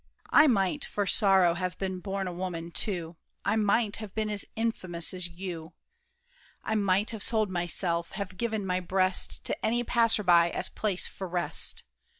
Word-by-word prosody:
I 310 Hz, -, +7 dB
might, 220 Hz, +3 st, +1 dB
For 205 Hz, -, -1 dB
sorrow, 190 Hz, -3 st, +4 dB
have 180 Hz, +1 st, -4 dB
been 190 Hz, -1 st, -3 dB
born 195 Hz, 0 st, -3 dB
a 180 Hz, -, -4 dB
woman 170 Hz, -2 st, -5 dB
too. 170 Hz, -4 st, -1 dB, 0.3 s
I -, -, +2 dB
might 210 Hz, 0 st, +1 dB
have 215 Hz, -3 st, -9 dB
been 215 Hz, -1 st, -1 dB
as 205 Hz, -1 st, -2 dB
infamous 185 Hz, -8 st, 0 dB
as 180 Hz, -1 st, +1 dB
you. 170 Hz, -2 st, -7 dB, 0.9 s
I 220 Hz, -, -2 dB
might 200 Hz, 0 st, +1 dB
have 220 Hz, -2 st, -6 dB
sold 215 Hz, -1 st, +1 dB
myself, 175 Hz, -1 st, -1 dB
have 195 Hz, -2 st, -5 dB
given 220 Hz, -1 st, -2 dB
my 180 Hz, -1 st, 0 dB
breast 185 Hz, +1 st, +1 dB
To -, -, -3 dB
any 240 Hz, +2 st, +1 dB
passer 230 Hz, -3 st, +3 dB
by, 170 Hz, -2 st, +5 dB
as -, -, -2 dB
place 200 Hz, -4 st, -1 dB
for 190 Hz, -, -6 dB
rest. 175 Hz, 0 st, 0 dB
190 Hz, 170 wpm, -28 LUFS, 175-215 Hz, 0.9 s, I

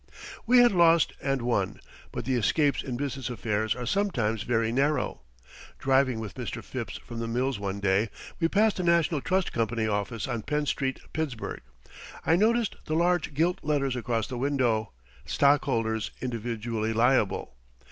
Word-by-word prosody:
We 250 Hz, +2 st, +6 dB
had 245 Hz, 0 st, +7 dB
lost 170 Hz, -3 st, +4 dB
and 135 Hz, -3 st, -1 dB
won, 110 Hz, -6 st, 0 dB, 0.3 s
but -, -, -5 dB
the 130 Hz, -, 0 dB
escapes 140 Hz, +5 st, +2 dB
in 125 Hz, -3 st, -4 dB
business 135 Hz, -1 st, -3 dB
affairs 110 Hz, -1 st, -1 dB
are 125 Hz, -, -5 dB
sometimes 120 Hz, -, 0 dB
very 115 Hz, -2 st, 0 dB
narrow. 140 Hz, -, 0 dB, 0.6 s
Driving 130 Hz, -3 st, +2 dB
with 110 Hz, -3 st, -6 dB
Mr. -, -, -5 dB
Phipps -, -, -5 dB
from 115 Hz, -, -8 dB
the 115 Hz, -, -3 dB
mills 125 Hz, 0 st, -1 dB
one 100 Hz, 0 st, -3 dB
day 100 Hz, +2 st, +2 dB, 0.3 s
we 165 Hz, -, +3 dB
passed 210 Hz, +4 st, +2 dB
the 185 Hz, -, -1 dB
National 170 Hz, -3 st, +2 dB
Trust 185 Hz, +3 st, 0 dB
Company 115 Hz, -1 st, 0 dB
office 105 Hz, +2 st, -2 dB
on 120 Hz, -3 st, -2 dB
Penn 150 Hz, +5 st, -1 dB
Street, 130 Hz, -2 st, -1 dB
Pittsburgh. 150 Hz, -8 st, -3 dB, 0.6 s
I 165 Hz, -, +4 dB
noticed 225 Hz, +3 st, +2 dB
the 155 Hz, -, -1 dB
large 175 Hz, -3 st, +1 dB
gilt 175 Hz, +5 st, +1 dB
letters 140 Hz, -3 st, 0 dB
across 115 Hz, -3 st, -1 dB
the 125 Hz, -, -5 dB
window, 125 Hz, -5 st, +1 dB, 0.4 s
"Stockholders 115 Hz, -, +2 dB
individually 115 Hz, -2 st, -3 dB
liable." 115 Hz, -, +2 dB
130 Hz, 155 wpm, -27 LUFS, 115-155 Hz, 0.6 s, had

